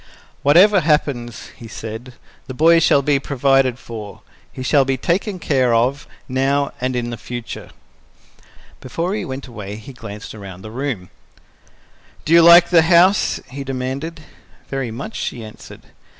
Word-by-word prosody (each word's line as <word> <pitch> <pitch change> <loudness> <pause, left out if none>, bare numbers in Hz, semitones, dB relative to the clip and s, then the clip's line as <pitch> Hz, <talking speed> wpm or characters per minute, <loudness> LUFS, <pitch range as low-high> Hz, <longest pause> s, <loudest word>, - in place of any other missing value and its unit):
"Whatever 185 +8 +6
happens," 145 - -1
he 115 - -11
said, 115 +3 -8 0.3
"the 130 - -7
boy 165 +4 +5
shall 140 -3 +3
be 140 0 +2
provided 135 -2 +1
for. 110 -5 -9 0.3
He 130 - -7
shall 140 +1 +3
be 135 0 -1
taken 185 - -1
care 130 -8 +1
of, 130 +5 0 0.2
now 135 +2 0
and 130 0 -1
in 120 -1 -2
the 120 - -5
future." 120 0 -7 1.1
Before 165 +9 -3
he 215 - -2
went 135 0 -6
away, 105 -5 -8
he 110 +5 -11
glanced 105 -3 -9
around 95 -3 -10
the 110 - -9
room. 120 -7 -4 1.1
"Do 160 - +1
you 170 - +8
like 170 +1 +8
the 170 -2 +7
house?" 175 +4 +3
he 140 +1 -6
demanded. 135 +5 -5 0.5
"Very 135 -3 -3
much," 135 - -7
she 120 - -4
answered. 110 - -13
135 Hz, 150 wpm, -19 LUFS, 120-155 Hz, 1.1 s, you